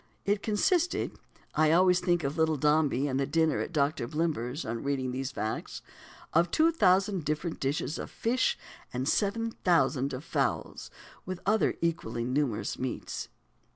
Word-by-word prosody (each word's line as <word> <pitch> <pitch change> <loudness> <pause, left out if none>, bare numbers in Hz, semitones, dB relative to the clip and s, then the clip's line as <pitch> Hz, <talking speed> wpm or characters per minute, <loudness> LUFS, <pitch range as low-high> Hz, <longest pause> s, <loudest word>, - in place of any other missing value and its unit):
"It 205 0 +1
consisted" 335 - +1 0.4
I 155 0 +3
always 180 +2 +5
think 175 -2 +1
of 140 +2 -2
Little 160 -1 +2
Dombey 150 -2 +2
and 135 -1 -1
the 135 - 0
dinner 160 0 +2
at - - -3
Doctor 145 -5 0
Blimber's, 150 -2 -2
on 115 +1 -3
reading 135 -2 -1
these 135 +2 -3
facts 110 -4 -4 0.5
"of 170 +2 +4
two 320 - +4
thousand 195 - +3
different 155 +3 -2
dishes 140 +3 -2
of - - -5
fish, 245 +3 0 0.3
and 125 +2 -2
seven 225 +6 +1
thousand 140 -5 +2
of 130 +3 -5
fowls, - - -2 0.3
with 185 -1 -5
other 215 +2 +2
equally 120 -8 -1
numerous 125 -4 -1
meats." 130 -1 -4
155 Hz, 155 wpm, -29 LUFS, 135-180 Hz, 0.5 s, always